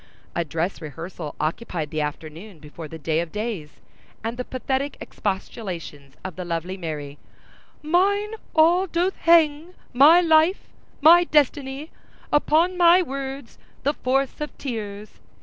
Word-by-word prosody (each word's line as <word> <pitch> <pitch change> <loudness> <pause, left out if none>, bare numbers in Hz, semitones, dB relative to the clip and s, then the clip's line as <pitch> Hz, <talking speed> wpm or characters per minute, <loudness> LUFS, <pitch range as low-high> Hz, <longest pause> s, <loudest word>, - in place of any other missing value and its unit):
A 170 - +1
dress 165 +4 -3
rehearsal 160 +1 -7
occupied 160 -1 -3
the 155 - -1
afternoon 160 +6 -6
before 155 +1 -10
the 160 - -9
day 160 0 -1
of 170 -1 -3
days, 210 -8 -4 0.5
and 225 +1 -3
the 250 - -4
pathetic 265 +2 -3
expostulations 180 - -5
of 190 -3 -5
the 185 - -4
lovely 175 +2 -3
Mary— 150 -5 -6 0.6
Mine 400 +6 +2 0.2
all 345 +4 +4
doth 355 +2 0
hang—my 320 -2 +4
life—my 330 0 +3
destiny— 290 -1 0 0.4
Upon 325 +5 +3
my 350 +1 +6
words—upon 275 -3 -8
the 285 - +1
force 270 +1 -1
of 300 - -5
tears! 215 -5 -6
245 Hz, 125 wpm, -23 LUFS, -, 0.6 s, my